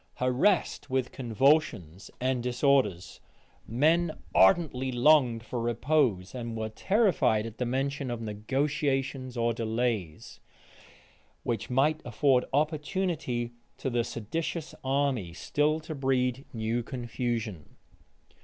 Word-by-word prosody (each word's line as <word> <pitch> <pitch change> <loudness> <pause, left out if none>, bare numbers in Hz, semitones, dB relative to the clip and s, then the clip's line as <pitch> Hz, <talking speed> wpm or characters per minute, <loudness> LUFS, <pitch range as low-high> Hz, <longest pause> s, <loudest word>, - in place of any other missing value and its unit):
Harassed 140 +4 +1
with 130 -1 0
convulsions 115 - +1
and 130 -1 0
disorders, 125 - +1 0.5
men 155 +7 +2 0.2
ardently 130 - +4
longed 125 -2 +4
for 120 -1 -3
repose; 120 -5 +1
and 115 -3 -5
were 110 0 -3
terrified 180 - +2
at 115 -1 -9
the 125 - 0
mention 135 +2 -1
of 120 -1 -3
negotiations 130 +3 -2
or 115 0 +1
delays, 110 -7 -2 1.0
which 115 -2 -2
might 145 +5 +2
afford 125 +2 +2
opportunity 150 -4 -1 0.3
to 130 - -3
the 120 0 +1
seditious 155 - -4
army 135 -9 0
still 150 - 0
to 160 +1 -6
breed 130 -2 0
new 115 +1 -1
confusion. 120 - -4
125 Hz, 105 wpm, -28 LUFS, 115-145 Hz, 1.0 s, ardently